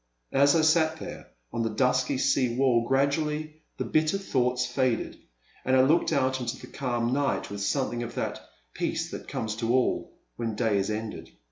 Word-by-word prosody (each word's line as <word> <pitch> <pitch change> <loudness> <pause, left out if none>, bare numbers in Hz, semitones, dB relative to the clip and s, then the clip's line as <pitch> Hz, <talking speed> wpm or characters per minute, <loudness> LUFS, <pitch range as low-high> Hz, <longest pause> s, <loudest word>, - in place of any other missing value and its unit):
And, 135 - +2
as 140 +3 +6
I 165 - +4
sat 160 0 +3
there - - -8 0.3
on 115 - -1
the 115 - 0
dusky 125 +3 +1
sea 130 -2 +2
wall, 120 -3 +3
gradually 150 +3 0 0.2
the - - -1
bitter 155 +5 +2
thoughts 125 -9 0
faded 130 -3 -1 0.4
and 130 - +2
I 130 - +6
looked 155 +6 +3
out 130 -1 +1
into 120 -2 -3
the - - -10
calm 120 -3 -2
night 140 -6 0
with 100 0 -5
something 120 +4 0
of 120 0 -6
that - - -3 0.3
peace - - -2
that - - -7
comes 110 -1 -3
to 115 0 -1
all 130 0 0 0.2
when 115 -2 -2
day 110 -3 +1
is 95 - -1
ended. 110 0 -5
130 Hz, 190 wpm, -27 LUFS, 115-140 Hz, 0.4 s, as